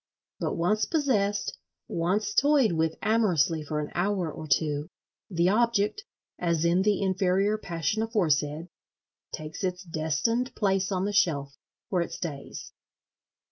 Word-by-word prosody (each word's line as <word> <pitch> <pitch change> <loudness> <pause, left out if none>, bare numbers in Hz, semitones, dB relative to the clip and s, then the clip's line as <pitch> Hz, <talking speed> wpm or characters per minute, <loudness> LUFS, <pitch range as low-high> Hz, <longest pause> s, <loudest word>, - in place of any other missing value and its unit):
But - - -2
once 210 +6 +2
possessed, 210 - 0 0.3
once 200 +5 0
toyed 280 -5 +4
with 160 -1 0
amorously 180 -8 +2
for 150 +1 -3
an 150 - -4
hour 180 -2 0
or 155 +1 -8
two, 150 +1 0 0.4
the 175 -1 +2
Object 230 - +1 0.4
(as 170 -2 +1
in 175 +2 +3
the 205 0 +2
inferior 190 +2 +2
passion 175 +3 -2
aforesaid) 165 -7 0 0.6
takes 155 +4 -6
its 180 0 -2
destined 165 - -1
place 195 -2 +1
on 185 0 0
the 205 - -2
shelf—where 160 0 -1
it 170 - -3
stays. 145 -5 -6
185 Hz, 130 wpm, -27 LUFS, 160-210 Hz, 0.6 s, toyed